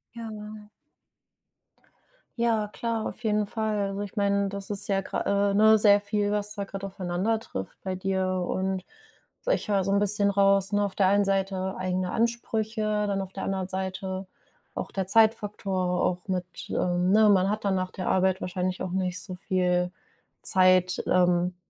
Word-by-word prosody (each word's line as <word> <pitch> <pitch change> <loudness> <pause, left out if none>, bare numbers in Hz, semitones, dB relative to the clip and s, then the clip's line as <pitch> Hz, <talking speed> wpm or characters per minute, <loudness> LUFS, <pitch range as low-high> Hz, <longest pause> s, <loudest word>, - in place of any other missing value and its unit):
Ja. 215 -2 -8 1.7
Ja, 225 -3 +1
klar, 225 +1 -3
auf 240 - -9
jeden 210 -1 +1
Fall. 215 -1 -2
Also, 195 0 -2
ich 205 +2 -7
meine, 200 -1 +1
das 200 0 -6
ist 205 -1 +1
ja 195 -1 +1
grad - - -4
äh, 200 0 +1
ne, 220 +1 +6
sehr 205 -1 +6
viel, 205 0 -1
was 210 0 -1
da 200 -1 -4
grad 195 0 -8
aufeinander 190 +3 -1
trifft 95 - -7
bei 190 -1 -3
dir. 190 0 -1 0.2
Und, 190 0 -2 0.5
also, - - -6
ich - - -6
höre 200 -2 +1
so 195 - -1
'n 200 - +3
bisschen 205 0 +3
raus, 195 0 +3
ne, 205 0 +2
auf 200 - -4
der 195 - +2
einen 200 +1 +3
Seite 195 -1 -1
eigene 185 0 -1
Ansprüche, 225 -1 -1 0.2
dann 195 -1 -1
auf 190 0 -8
der 195 - -6
anderen 190 -1 -2
Seite 190 0 -4 0.5
auch - - -5
der 190 -2 -3
Zeitfaktor, 200 -4 +2
auch 180 +2 -1
mit, 185 -1 -1 0.2
äh - - -5
ne, 185 +5 +3
man 195 -1 +4
hat 210 0 -3
dann 195 - +2
nach 185 -1 -1
der 185 - -6
Arbeit 190 0 +2
wahrscheinlich 180 0 -3
auch 185 - -4
nicht 185 -1 -1
so 185 +1 -5
viel 180 -1 0 0.5
Zeit, 185 -1 +4
ähm, 180 0 +2
195 Hz, 175 wpm, -26 LUFS, 185-210 Hz, 1.7 s, ne